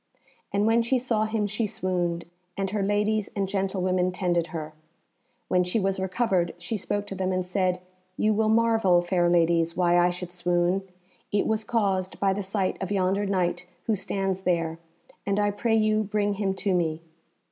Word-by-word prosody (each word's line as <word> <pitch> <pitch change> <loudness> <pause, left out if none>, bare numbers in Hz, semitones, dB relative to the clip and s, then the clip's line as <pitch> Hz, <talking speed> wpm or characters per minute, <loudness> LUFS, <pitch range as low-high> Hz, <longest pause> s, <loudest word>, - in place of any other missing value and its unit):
And 200 +1 +1
when 225 +1 +4
she 235 +3 +1
saw 235 -3 0
him 220 -1 -1
she 215 +2 -1
swooned, 175 -4 -2 0.3
and 195 -1 -1
her 210 -1 -1
ladies 205 +1 +1
and 195 -2 0
gentlewomen 185 -2 0
tended 175 -2 0
her. 155 -3 -6 0.7
When 180 0 +3
she 180 +5 0
was 195 -1 0
recovered, 190 -1 0
she 175 +6 -4
spoke 205 0 -2
to 200 - -6
them 190 -1 -1
and 185 -1 -1
said, 180 -1 0 0.4
"You 215 0 +2
will 215 +1 +2
marvel, 220 -6 +4
fair 175 -1 +2
ladies, 170 -1 +2
why 175 -1 +4
I 175 0 +4
should 180 0 -5
swoon. 175 +1 +1 0.5
It 205 - +1
was 220 0 0
caused 200 -5 0
by 195 -1 +2
the 205 - -3
sight 190 0 -2
of 190 - -3
yonder 195 +1 +1
Knight 180 -2 -1 0.2
who 220 - +1
stands 195 -1 -2
there, 165 -3 0 0.4
and 200 0 0
I 205 0 +2
pray 225 +2 0
you 215 0 +3
bring 205 0 0
him 195 -1 -1
to 195 0 0
me." 165 -3 0
190 Hz, 180 wpm, -26 LUFS, 180-210 Hz, 0.7 s, when